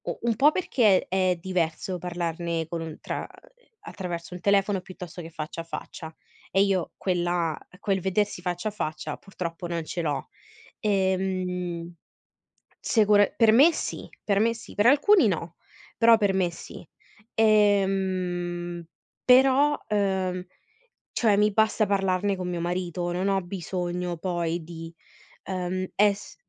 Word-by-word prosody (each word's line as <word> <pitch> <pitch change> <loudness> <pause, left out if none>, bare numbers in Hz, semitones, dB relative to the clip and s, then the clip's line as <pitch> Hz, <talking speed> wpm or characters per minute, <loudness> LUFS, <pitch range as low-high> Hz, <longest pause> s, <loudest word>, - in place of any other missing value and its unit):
U - - -4
un 235 -1 +1
po' 280 +6 +5
perché 230 - +2
è 185 -1 +1
diverso 180 0 -2
parlarne 170 -1 -3
con 165 -2 -5
tra, - - -4
mhmm, - - -6 0.5
attraverso 175 -2 -6
il 180 - -8
telefono 200 0 +2
piuttosto 180 -1 -9
che 165 - -9
faccia 160 0 -6
a - - -8
faccia, 160 0 -8 0.3
e 195 - +3
io 195 -3 0
quella 175 -3 0 0.2
quel 195 -2 0
vedersi 195 +1 0
faccia 180 +3 -2
a - - -9
faccia 155 -6 -4
purtroppo 175 -3 -6
non 170 -1 -3
ce 175 - -3
l'ho. 145 -5 -2 0.5
Ehm, 185 -3 -1 0.9
secu 210 -3 +3
per 225 0 +5
me 285 +9 +7
sì, - - -5 0.2
per 200 -1 +2
me 230 +2 +3
sì, 225 - -12
per 205 - +2
alcuni 295 - +6
no, 170 -2 -3 0.4
però 230 0 +6
per 205 -3 +2
me 185 -2 +1
sì, 170 - -10 0.5
ehm, 190 -5 +1 0.4
però, 270 +3 +5
uhm, 190 -3 0 0.7
cioè 215 -4 +3
mi 210 +1 +3
basta 220 +1 +2
parlarne 195 0 +1
con 180 -1 -4
mio 175 -1 -3
marito, 175 0 -2
non 185 +3 -1
ho 195 -1 +2
bisogno 180 -1 -3
poi 170 -1 -2
di, 165 0 -9 0.5
ehm, 185 0 -3
es 205 0 +1
185 Hz, 140 wpm, -26 LUFS, 175-205 Hz, 0.9 s, me